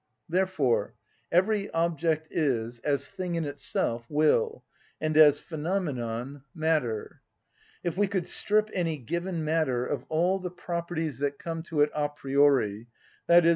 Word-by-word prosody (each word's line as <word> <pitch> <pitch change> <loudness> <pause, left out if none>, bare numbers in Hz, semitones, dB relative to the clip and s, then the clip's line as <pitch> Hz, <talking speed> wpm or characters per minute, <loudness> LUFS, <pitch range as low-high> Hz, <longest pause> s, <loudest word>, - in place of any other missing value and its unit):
Therefore 175 -8 +1 0.4
every 200 +3 +2
object 165 -1 +1
is, 120 -6 0
as 140 +1 0
thing 180 -2 -4
in 165 -2 -1
itself, 120 -4 -2
will, 155 - +2 0.4
and 155 0 -1
as 150 -2 +8
phenomenon, 145 -7 -3
matter. 155 -9 -1 0.6
If 175 0 -2
we 205 0 +3
could 190 -3 -1
strip 215 +3 +1
any 165 -4 0
given 170 +5 -3
matter 150 -6 +1
of 145 - -3
all 175 +5 +2
the 180 -1 -4
properties 170 -4 -4
that 140 0 -1
come 165 -1 -4
to 155 -3 +1
it 150 - +4
a 150 -1 0
priori, 135 -7 +2 0.4
_i.e. 170 -1 +7
155 Hz, 135 wpm, -28 LUFS, 140-175 Hz, 0.6 s, as